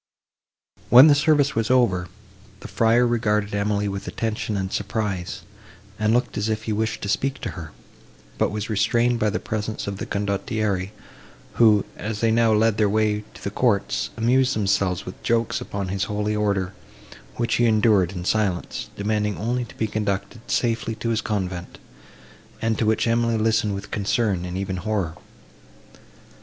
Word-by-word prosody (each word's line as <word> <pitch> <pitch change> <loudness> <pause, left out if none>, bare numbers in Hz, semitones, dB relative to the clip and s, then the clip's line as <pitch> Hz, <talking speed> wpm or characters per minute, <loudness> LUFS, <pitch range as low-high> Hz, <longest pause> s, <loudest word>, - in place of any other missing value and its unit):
When 125 +3 +10
the 155 - +7
service 145 -1 +3
was 115 -1 -1
over, 110 -9 +2 0.5
the - - -8
friar 115 +2 +3
regarded 105 -3 0
Emily 100 0 0
with 100 0 -5
attention 110 -2 -2
and 95 -1 -3
surprise, 100 -3 -3 0.6
and 110 0 +2
looked 120 -2 0
as 105 +2 -1
if 110 0 -2
he 110 - -2
wished 110 +1 -2
to - - -3
speak 135 +7 0
to - - -3
her, 80 -5 -8 0.7
but - - +2
was 105 0 -4
restrained 115 +3 +1
by 105 - +2
the 105 - -1
presence 110 0 -4
of 100 -1 -4
the - - -5
condottieri, 100 -1 -1 0.7
who, 105 -3 +6
as 105 0 -4
they 115 0 +2
now 115 0 +3
led 110 0 +3
the 105 -2 +3
way 105 0 +1
to - - -13
the 100 - -3
courts, 105 -3 0
amused 125 +3 +2
themselves 100 -3 0
with 90 - -9
jokes 115 -1 0
upon 100 -2 -4
his 100 +1 -1
holy 105 +1 -2
order, 100 -3 0 0.6
which 120 -1 0
he 120 - +3
endured 105 -5 +3
in 90 -2 -6
silence, 100 -4 -1
demanding 105 0 -1
only 120 +3 -1
to - - -15
be 110 - 0
conducted 105 +1 -3
safely 115 -1 0
to 115 - -3
his 115 -1 +1
convent, 95 -5 -4 0.8
and 115 -1 -1
to 110 - +1
which 110 - +2
Emily 115 0 +1
listened 110 -2 +1
with 100 +1 -8
concern 100 -3 0
and 90 +1 -4
even 95 -1 -3
horror. 95 -4 -2
105 Hz, 170 wpm, -23 LUFS, 100-115 Hz, 0.8 s, When